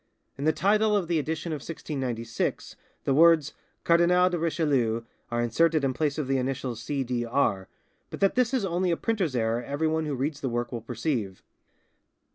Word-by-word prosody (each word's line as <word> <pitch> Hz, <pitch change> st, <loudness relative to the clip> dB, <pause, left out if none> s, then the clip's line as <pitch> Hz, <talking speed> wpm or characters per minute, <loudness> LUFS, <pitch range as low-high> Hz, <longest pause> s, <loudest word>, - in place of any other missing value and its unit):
In 140 Hz, -, -5 dB
the 155 Hz, -, +5 dB
title 210 Hz, +5 st, +2 dB
of 185 Hz, -4 st, -2 dB
the 165 Hz, -2 st, +1 dB
edition 160 Hz, +2 st, -3 dB
of 155 Hz, -, -2 dB
1696 130 Hz, -7 st, -4 dB, 0.3 s
the 135 Hz, -, +1 dB
words 160 Hz, -1 st, +5 dB, 0.3 s
"Cardinal 180 Hz, +2 st, +4 dB
de 175 Hz, -, -1 dB
Richelieu" 145 Hz, -9 st, +1 dB, 0.3 s
are 120 Hz, 0 st, 0 dB
inserted 155 Hz, +6 st, +2 dB
in 135 Hz, -1 st, +1 dB
place 145 Hz, +2 st, -1 dB
of 150 Hz, -, -1 dB
the 135 Hz, 0 st, +1 dB
initials 125 Hz, -2 st, -3 dB
"C. 135 Hz, +4 st, -2 dB
D. 120 Hz, -1 st, -2 dB
R.," 115 Hz, -6 st, 0 dB, 0.4 s
but -, -, -7 dB
that 195 Hz, -1 st, +3 dB
this 250 Hz, -2 st, +2 dB
is 255 Hz, -7 st, 0 dB
only 180 Hz, 0 st, 0 dB
a 170 Hz, -, +1 dB
printer's 195 Hz, -, -1 dB
error 115 Hz, 0 st, 0 dB
everyone 155 Hz, +4 st, -1 dB
who 145 Hz, -, -2 dB
reads 145 Hz, +3 st, -3 dB
the 135 Hz, -, -1 dB
work 120 Hz, 0 st, -2 dB
will 120 Hz, -2 st, -4 dB
perceive. 115 Hz, -, -3 dB
145 Hz, 185 wpm, -27 LUFS, 120-170 Hz, 0.4 s, the